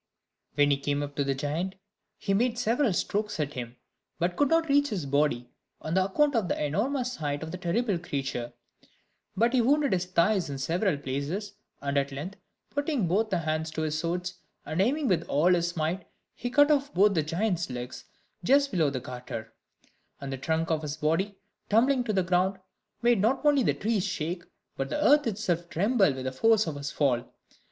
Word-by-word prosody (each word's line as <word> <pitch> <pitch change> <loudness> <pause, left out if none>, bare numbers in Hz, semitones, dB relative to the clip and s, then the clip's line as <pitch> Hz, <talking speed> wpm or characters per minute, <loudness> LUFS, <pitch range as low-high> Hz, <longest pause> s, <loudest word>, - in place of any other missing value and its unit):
When 145 0 +4
he 140 - +3
came 145 +1 -1
up 145 0 -7
to 140 - +2
the 135 -1 0
giant, 155 +8 -2 0.4
he 195 - -1
made 235 +3 +1
several 240 +1 +2
strokes 210 +2 -1
at 150 -1 -1
him, 120 -1 -6 0.4
but 175 +1 0
could 290 - +3
not 325 0 +3
reach 285 0 +4
his 185 - -3
body, 140 -3 0 0.3
on 160 +2 -3
account 195 +10 +2
of 220 -5 +1
the - - -1
enormous 250 - -1
height 145 -1 -2
of 160 - -6
the 180 - -6
terrible 195 +2 0
creature; 135 -7 -3 0.9
but 235 +4 +3
he 255 - +4
wounded 285 +2 +3
his 180 -1 0
thighs 185 0 +2
in 140 - -4
several 165 +5 0
places; 145 +10 -3 0.3
and 140 0 +1
at 140 0 -2
length, 160 +9 -6 0.3
putting 285 - 0
both 210 +5 +1
hands 160 -3 -1
to 160 0 -3
his 155 -1 -1
sword, 180 +2 -2 0.3
and 155 +4 -1
aiming 275 +7 +1
with 180 -6 +2
all 165 +6 +4
his 175 0 0
might, 165 +4 -1 0.3
he 245 - -4
cut 290 +4 +5
off 285 -1 +2
both 200 +3 +5
the 160 - +2
giant's 170 +2 -1
legs 125 0 -6 0.4
just 280 +7 +4
below 160 -6 +2
the 135 -2 -3
garter; 125 -3 -7 0.7
and 135 -1 -5
the - - -3
trunk 160 +3 0
of 155 -1 +1
his 150 -1 -4
body, 165 +7 0 0.3
tumbling 250 +4 +4
to 230 - -1
the 190 -3 +2
ground, 185 +2 +1 0.5
made 240 -4 +4
not 260 +8 +1
only 290 -2 +5
the - - +2
trees 215 -2 0
shake, 175 -2 -3 0.3
but 135 0 -3
the - - -1
earth 295 -2 +5
itself 175 -5 -1
tremble 200 - +3
with 130 -1 -5
the 130 - -1
force 220 +10 +3
of 160 - -4
his 140 0 -4
fall. 130 -4 0
175 Hz, 195 wpm, -28 LUFS, 145-220 Hz, 0.9 s, cut